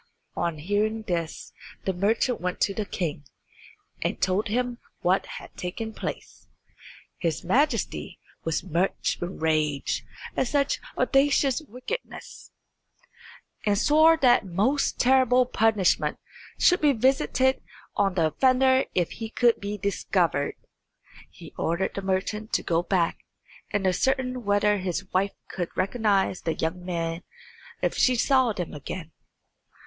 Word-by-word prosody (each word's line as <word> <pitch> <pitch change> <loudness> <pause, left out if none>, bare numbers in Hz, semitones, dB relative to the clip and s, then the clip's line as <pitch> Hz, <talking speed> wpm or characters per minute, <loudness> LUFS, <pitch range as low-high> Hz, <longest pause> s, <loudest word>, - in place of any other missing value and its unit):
On 170 -2 -1
hearing 210 +7 -1
this 170 -5 -4 0.3
the 190 - 0
merchant 220 +6 +1
went 180 0 -2
to 200 - +2
the 210 0 -3
king, 155 -6 -3 0.8
and - - -1
told 190 +3 +1
him 245 +2 -1 0.2
what 185 +2 +2
had - - -10
taken 220 +5 -5
place. - - -7 0.7
His 165 -4 -1
Majesty 275 - 0 0.3
was 165 -1 -1
much 180 +1 -1
enraged 155 -5 -1 0.3
at 260 - +1
such 280 +1 +1 0.2
audacious 275 -1 +3
wickedness, 280 - -7 1.1
and 205 -1 +2
swore 315 +7 +5
that 250 -6 +4
most 205 +10 0
terrible 255 -1 +4
punishment 220 -6 +2 0.4
should 355 - +4
be 295 -2 +4
visited 265 +1 +2 0.3
on 195 -3 +1
the 165 -3 +3
offender 260 +3 +4
if 175 -2 +1
he 225 -1 -6
could 235 0 +3
be 205 +1 -4
discovered. 180 -6 0 0.7
He - - -13
ordered 170 +4 0
the 195 - -4
merchant 195 +3 -2
to - - +1
go 165 0 +1
back 175 -2 0 0.5
and 205 -1 -1
ascertain 255 +5 0
whether 205 0 +3
his 185 0 -3
wife 195 +2 +1
could 175 -2 -4
recognise 195 -3 +1
the 165 - -1
young 175 +3 -3
men 170 -1 -3 0.6
if - - +2
she 255 - +3
saw 260 0 +3
them 180 -5 -4
again. 160 +3 -7
205 Hz, 130 wpm, -26 LUFS, 180-250 Hz, 1.1 s, swore